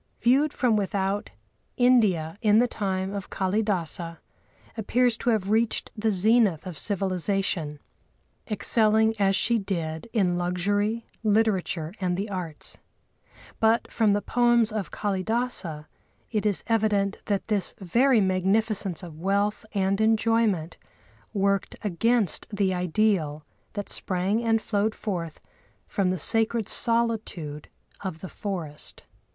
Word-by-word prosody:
Viewed 275 +5 +3
from 245 -6 +1
without, 200 0 -1 0.5
India, 210 - +3
in 210 -2 +4
the 245 +2 +4
time 190 -3 -2
of 200 -1 -5
Kâlidâsa, 185 -4 -1 0.6
appeared 245 +3 +2
to - - 0
have 210 -3 +1
reached 225 +1 +1
the 220 +1 0
zenith 210 -3 +3
of 180 -5 -7
civilisation, 190 -5 -1 0.7
excelling 220 0 +4
as 195 -1 +3
she 235 +3 +2
did 170 -2 -4
in 180 -6 +1
luxury, 205 +6 0 0.2
literature 200 -6 +1
and 180 -1 0
the 205 +2 -3
arts. 175 -5 -6 0.8
But 225 +1 +2
from 215 -3 +3
the 205 - 0
poems 240 -2 +3
of 215 -3 -3
Kâlidâsa 195 -5 -2 0.5
it 215 -2 0
is 205 - -1
evident 210 -3 +1
that 200 -2 -1
this 210 -4 +1
very 235 +7 +3
magnificence 190 0 +1
of 160 -3 -10
wealth 200 +4 0
and 195 0 0
enjoyment 220 -6 +2 0.5
worked 200 -1 0
against 210 0 +1
the 200 -3 0
ideal 180 -4 0 0.3
that 205 -1 -4
sprang 190 +5 0
and 225 -1 +2
flowed 215 0 -1
forth 170 -7 -4 0.5
from 195 -2 0
the 185 - 0
sacred 225 +4 +1
solitude 220 -11 -1 0.4
of 185 -4 -5
the 185 - -7
forest. 170 -8 -6
200 Hz, 125 wpm, -26 LUFS, 185-220 Hz, 0.8 s, in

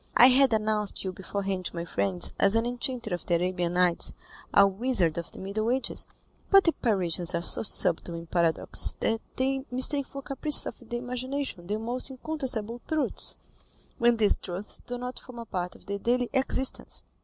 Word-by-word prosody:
"I 245 - +8
had 265 0 +5
announced 215 -1 +1
you 190 - -3
beforehand 190 0 -4
to - - -5
my 170 0 -4
friends 100 - +1
as 200 +2 +4
an 225 +1 +1
enchanter 240 -3 -3
of 175 - -5
the 175 - +2
Arabian 175 0 -1
Nights, 180 -1 +2 0.4
a 200 - +6
wizard 195 -5 +1
of 170 - -8
the - - -15
Middle 210 +4 -3
Ages; 260 +2 +2 0.4
but 390 -1 +6
the 330 - +3
Parisians 180 - 0
are 170 - -2
so - - +3
subtle 175 -4 +2
in 165 0 -7
paradoxes 170 -1 +2
that 225 0 0
they 270 +1 -1
mistake 260 +2 +1
for 275 0 -9
caprices 280 +2 +3
of 240 - -9
the 240 - -3
imagination 250 -5 -5
the 210 +2 -2
most 240 +4 -2
incontestable 255 -5 -3
truths, 315 -2 +3 0.6
when 235 0 +3
these 210 -2 +2
truths 185 +3 -6
do 245 0 -4
not 250 +1 -6
form 250 -1 -13
a 235 - -7
part 180 -4 -4
of - - -19
their 200 0 -4
daily 245 +2 -1
existence. 265 -1 +1
225 Hz, 185 wpm, -27 LUFS, 185-255 Hz, 0.6 s, I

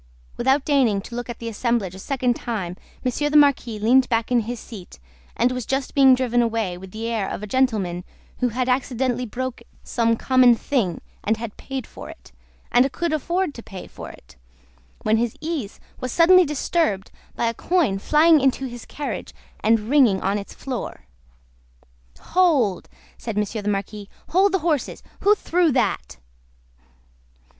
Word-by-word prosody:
Without 270 +2 +2
deigning 260 -9 +3
to 235 - -11
look 245 0 -5
at 240 - -5
the 230 - -7
assemblage 230 -4 -1
a 190 - -10
second 255 +2 0
time, 195 -9 -4 0.3
Monsieur 290 +4 0
the 300 - +4
Marquis 275 -6 +3
leaned 245 +5 +3
back 230 0 0
in 245 - +4
his 235 +1 -4
seat, 205 -7 -11 0.4
and 245 +2 +3
was 250 -1 -3
just 270 0 -2
being 265 -2 +6
driven 245 -2 +1
away 225 -6 -1
with 190 +2 -10
the 220 +4 -6
air 220 -4 -1
of - - -5
a - - -2
gentleman 210 -7 0 0.4
who 250 - +1
had 250 +2 -2
accidentally 250 -1 0
broke 255 +3 -4 0.2
some 230 -1 +1
common 255 -2 +5
thing, 225 - -1 0.2
and 220 +1 +1
had 225 -2 -6
paid 270 -1 -6
for - - -11
it, - - -14 0.4
and 255 +3 +4
could 340 0 -2
afford 340 +2 -1
to 235 - -9
pay 195 -4 -9
for - - -10
it; - - -16 0.7
when 215 +1 +3
his 230 0 -1
ease 310 -9 -4 0.2
was 255 - -4
suddenly 360 +4 +6
disturbed 290 - -1 0.2
by - - -1
a 230 - +1
coin 290 - +1
flying 310 +6 +5
into 270 0 +1
his 240 -2 -8
carriage, 290 - -5 0.2
and 220 0 +3
ringing 250 -10 +5
on 200 +2 0
its 200 - -10
floor. 255 - -6 1.1
"Hold!" 295 - +2 0.3
said 225 -3 -5
Monsieur 210 +1 -1
the 205 - -2
Marquis. 205 0 -4 0.2
"Hold 385 +3 +4
the - - +4
horses! 305 -6 -1 0.2
Who 415 +1 +4
threw 350 -4 +1
that?" 65 - -1
245 Hz, 170 wpm, -23 LUFS, 215-275 Hz, 1.1 s, being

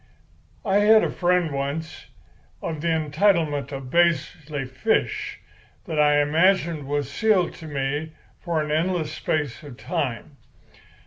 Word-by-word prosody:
"I 195 -1 +3
had 215 +1 +6
a - - 0
friend 180 -2 +1
once, 140 +4 -4 0.5
of 155 -2 -4
the 170 - -2
entitlement 155 - +1
of 135 -2 -7
Paisley 155 -4 +1
Fish, 130 - -1 0.5
that 160 -6 -3
I 145 0 +5
imagined 165 -1 +2
was 145 -2 -1
sealed 210 -6 +1
to 160 - -9
me 145 +2 -3 0.3
for 165 -3 -1
an 150 - -4
endless 160 0 0
space 150 -5 -2
of 140 -5 -11
time. 125 +3 -4
155 Hz, 130 wpm, -24 LUFS, 145-170 Hz, 0.5 s, had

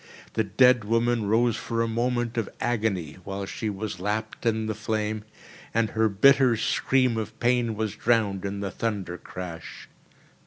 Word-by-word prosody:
The 110 - +1
dead 125 +3 +4
woman 115 0 +1
rose 115 +2 +3
for 115 0 -1
a - - -1
moment 120 +1 -1
of 115 -3 -1
agony, 105 -10 -1
while 100 +1 -4
she 110 +3 -4
was 100 -1 -5
lapped 110 +4 -3
in 110 -1 +1
the 110 - -1
flame, 110 0 -2 0.5
and 115 -1 +2
her 110 0 +2
bitter 125 +3 +5
scream 130 +1 +2
of 110 - -5
pain 120 -2 +2
was 110 -1 -2
drowned 110 -5 +1
in 100 0 -3
the 100 -2 -3
thundercrash. 90 -5 -5
110 Hz, 155 wpm, -26 LUFS, 100-115 Hz, 0.5 s, bitter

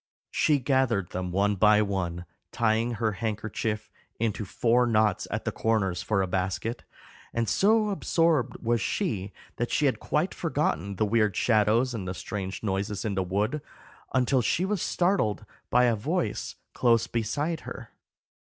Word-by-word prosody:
She 150 -2 +3
gathered 130 - +1
them 90 -1 -3
one 100 +3 +2
by 105 +2 +5
one, 90 -3 -3 0.3
tying 115 +1 +1
her 110 0 0
handkerchief 110 +1 -3 0.3
into 110 -1 -1
four 120 +5 +2
knots 110 -4 +2
at - - -3
the - - 0
corners 100 -6 0
for 100 -3 +1
a - - -2
basket; 95 +6 -2 0.5
and 115 -1 0
so 210 - +3
absorbed 165 - +1
was 115 -1 +1
she 105 - -2 0.3
that - - -1
she - - +1
had - - +1
quite - - 0
forgotten 100 +6 -1
the 110 - +1
weird 105 -2 +2
shadows 115 +3 +3
and 100 -5 -4
the 95 - -3
strange 95 -1 -5
noises 100 0 -2
in 105 - -1
the 95 - 0
wood, 105 +10 -1 0.5
until 130 0 +2
she 170 +9 +1
was 200 -2 -1
startled 175 - +1 0.2
by 125 - +4
a 120 -2 +3
voice 160 - -2 0.2
close 115 -2 +3
beside 145 +9 -2
her. - - -9
110 Hz, 155 wpm, -27 LUFS, 100-125 Hz, 0.5 s, by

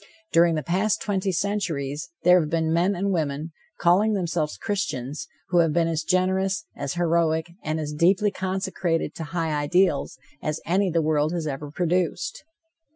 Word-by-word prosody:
During 170 0 +5
the 155 - -2
past 190 +2 +1
twenty 195 -1 -1
centuries 170 -6 -2
there 180 +1 +7
have 155 -3 -1
been 160 0 +1
men 180 +4 +2
and 195 +3 -1
women, 155 -2 -2 0.3
calling 195 +5 +4
themselves 170 -5 -1
Christians, 150 - -3 0.2
who 175 -2 +3
have 165 -2 +3
been 165 0 +2
as 160 -1 -1
generous, 190 +4 +1
as 140 +1 -4
heroic 170 -1 +1
and 155 +1 -1
as 150 -1 -4
deeply 185 +7 +3
consecrated 185 -4 -2
to 160 - -6
high 165 0 -2
ideals 150 +1 +1 0.2
as 155 +1 -2
any 185 +3 +2
the 165 -1 +1
world 155 +1 +1
has 170 -3 -2
ever 145 0 -4
produced. 175 +2 -1
170 Hz, 160 wpm, -25 LUFS, 155-185 Hz, 0.3 s, there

